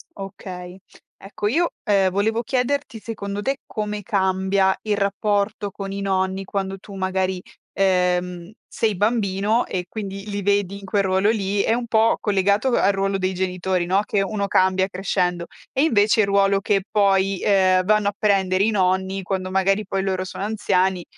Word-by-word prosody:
Okay. 185 Hz, -2 st, -8 dB, 0.4 s
Ecco 205 Hz, +1 st, -4 dB
io, 330 Hz, +10 st, +1 dB
ehm, 200 Hz, -4 st, +3 dB
volevo 220 Hz, +4 st, 0 dB
chiederti 255 Hz, 0 st, -1 dB
secondo 205 Hz, -2 st, -5 dB
te 270 Hz, +5 st, -1 dB
come 210 Hz, -1 st, -4 dB
cambia 190 Hz, -1 st, +1 dB
il 210 Hz, -2 st, 0 dB
rapporto 205 Hz, +1 st, -1 dB
con 195 Hz, 0 st, -6 dB
i 200 Hz, -, -4 dB
nonni 190 Hz, 0 st, -1 dB
quando 195 Hz, 0 st, -3 dB
tu 200 Hz, +1 st, -12 dB
magari, 185 Hz, -1 st, -1 dB, 0.3 s
ehm, 180 Hz, -1 st, 0 dB, 0.2 s
sei 215 Hz, -2 st, -1 dB
bambino 210 Hz, +1 st, +1 dB
e 180 Hz, -1 st, -4 dB
quindi 200 Hz, -1 st, -6 dB
li 200 Hz, 0 st, -3 dB
vedi 200 Hz, -1 st, +1 dB
in 200 Hz, -, -11 dB
quel 200 Hz, +1 st, +1 dB
ruolo 190 Hz, +2 st, +2 dB
lì, 200 Hz, -2 st, 0 dB
è 225 Hz, -, +1 dB
un 240 Hz, 0 st, -2 dB
po' 225 Hz, 0 st, +3 dB
collegato 200 Hz, +4 st, +1 dB
al 200 Hz, -5 st, +3 dB
ruolo 195 Hz, 0 st, 0 dB
dei 185 Hz, 0 st, -1 dB
genitori, 185 Hz, -1 st, -1 dB
no, 190 Hz, +3 st, +3 dB
che 200 Hz, -, 0 dB
uno 200 Hz, 0 st, -2 dB
cambia 190 Hz, 0 st, +2 dB
crescendo; 180 Hz, -2 st, -1 dB, 0.3 s
e 270 Hz, -, +1 dB
invece 220 Hz, -7 st, +3 dB
il 200 Hz, -, +1 dB
ruolo 200 Hz, 0 st, +3 dB
che 200 Hz, -2 st, +1 dB
poi, 195 Hz, -2 st, +2 dB
ehm, 185 Hz, -2 st, +3 dB
vanno 210 Hz, 0 st, +3 dB
a 205 Hz, -, -8 dB
prendere 195 Hz, -2 st, +2 dB
i 220 Hz, -, +3 dB
nonni 190 Hz, -1 st, 0 dB
quando 185 Hz, 0 st, -3 dB
magari 195 Hz, +2 st, +1 dB
poi 195 Hz, 0 st, -2 dB
loro 185 Hz, -1 st, -1 dB
sono 190 Hz, -, -6 dB
anziani, 190 Hz, -4 st, 0 dB
195 Hz, 170 wpm, -22 LUFS, 190-205 Hz, 0.4 s, ehm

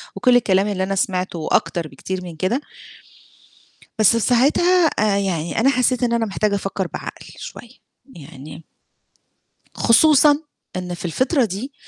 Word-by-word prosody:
وكل 250 Hz, -1 st, +3 dB
الكلام 195 Hz, -3 st, +2 dB
اللي 190 Hz, -2 st, -2 dB
أنا 195 Hz, +1 st, -2 dB
سمعته 185 Hz, -2 st, -2 dB
وأكتر 165 Hz, +1 st, -1 dB
بكتير 185 Hz, +7 st, -6 dB
من 170 Hz, -2 st, -9 dB
كده. 190 Hz, -, -1 dB, 1.4 s
بس 215 Hz, -, +6 dB
في 230 Hz, -, +1 dB
ساعتها 315 Hz, +10 st, +3 dB
آآ 210 Hz, -6 st, 0 dB
يعني 175 Hz, -3 st, -2 dB
أنا 260 Hz, -, +4 dB
حسيت 255 Hz, -1 st, +1 dB
إن 235 Hz, -1 st, +1 dB
أنا 230 Hz, -1 st, +1 dB
محتاجة 205 Hz, 0 st, -1 dB
أفكر 195 Hz, -2 st, -3 dB
بعقل -, -, -8 dB
شوية، 240 Hz, -, -10 dB, 0.5 s
يعني 150 Hz, 0 st, -12 dB, 1.1 s
خصوصًا 290 Hz, +4 st, +5 dB, 0.4 s
إن 180 Hz, -1 st, -4 dB
في 175 Hz, -, -7 dB
الفترة 260 Hz, -, +1 dB
دي 220 Hz, +8 st, -6 dB
200 Hz, 140 wpm, -20 LUFS, 180-250 Hz, 1.4 s, بس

